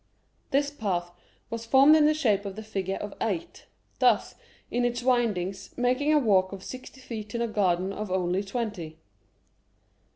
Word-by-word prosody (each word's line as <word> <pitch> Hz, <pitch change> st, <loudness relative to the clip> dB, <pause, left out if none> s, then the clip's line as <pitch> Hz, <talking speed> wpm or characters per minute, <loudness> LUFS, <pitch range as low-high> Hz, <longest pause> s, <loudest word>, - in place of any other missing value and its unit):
This 285 Hz, +1 st, +1 dB
path 185 Hz, -10 st, -2 dB, 0.4 s
was 230 Hz, 0 st, -5 dB
formed 275 Hz, +5 st, +7 dB
in 305 Hz, -1 st, +5 dB
the 305 Hz, -, +3 dB
shape 215 Hz, -10 st, +2 dB
of 195 Hz, -1 st, -5 dB
the 220 Hz, -, -7 dB
figure 195 Hz, -3 st, -3 dB
of 205 Hz, 0 st, -6 dB
8, 195 Hz, -7 st, -3 dB, 0.3 s
thus, -, -, +3 dB, 0.4 s
in 245 Hz, +1 st, +1 dB
its 240 Hz, 0 st, -1 dB
windings, 210 Hz, -7 st, 0 dB
making 255 Hz, +4 st, +2 dB
a 305 Hz, -, +5 dB
walk 195 Hz, -8 st, +3 dB
of 195 Hz, -1 st, -8 dB
sixty 255 Hz, +3 st, -9 dB
feet 220 Hz, -4 st, -7 dB
in 235 Hz, -, -1 dB
a -, -, 0 dB
garden 190 Hz, -3 st, +1 dB
of 210 Hz, 0 st, -5 dB
only 185 Hz, +1 st, 0 dB
twenty. 200 Hz, -7 st, -4 dB
215 Hz, 165 wpm, -27 LUFS, 190-250 Hz, 0.4 s, formed